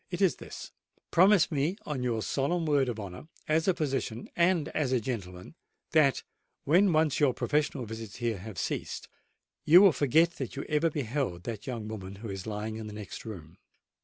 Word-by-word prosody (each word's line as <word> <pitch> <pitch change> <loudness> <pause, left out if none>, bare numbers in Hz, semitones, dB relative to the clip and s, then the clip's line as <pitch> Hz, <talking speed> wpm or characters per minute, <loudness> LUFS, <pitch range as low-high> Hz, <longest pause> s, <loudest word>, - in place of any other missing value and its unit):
"It 175 - -4
is 190 -3 +3
this:—Promise 190 0 +1
me, 155 +6 0
on 145 -4 -3
your 115 -3 -1
solemn 160 +5 0
word 145 -4 +2
of 115 -2 -4
honour, 100 +7 -8 0.2
as 160 +3 +2
a 190 - +3
physician 135 -7 -2
and 170 -3 +3
as 145 -5 -1
a 130 - +3
gentleman, 95 - -6 0.4
that, 150 -4 +3 0.4
when 180 +6 +4
once 155 -3 +2
your 140 -4 +3
professional 145 -4 0
visits 110 -1 -7
here 115 -5 -2
have 105 +1 -9
ceased, - - -3 0.6
you 170 +4 +8
will 195 -1 +8
forget 160 +4 +3
that 130 -4 -5
you 140 - -4
ever 155 +2 +1
beheld 130 - -2
that 110 +1 -6
young 115 -4 -4
woman 100 -3 -7
who 110 +2 -8
is 95 0 -6
lying 110 +1 -4
in 110 -1 -6
the 105 - -8
next 105 0 -8
room. 85 -6 -9
130 Hz, 185 wpm, -29 LUFS, 110-155 Hz, 0.6 s, you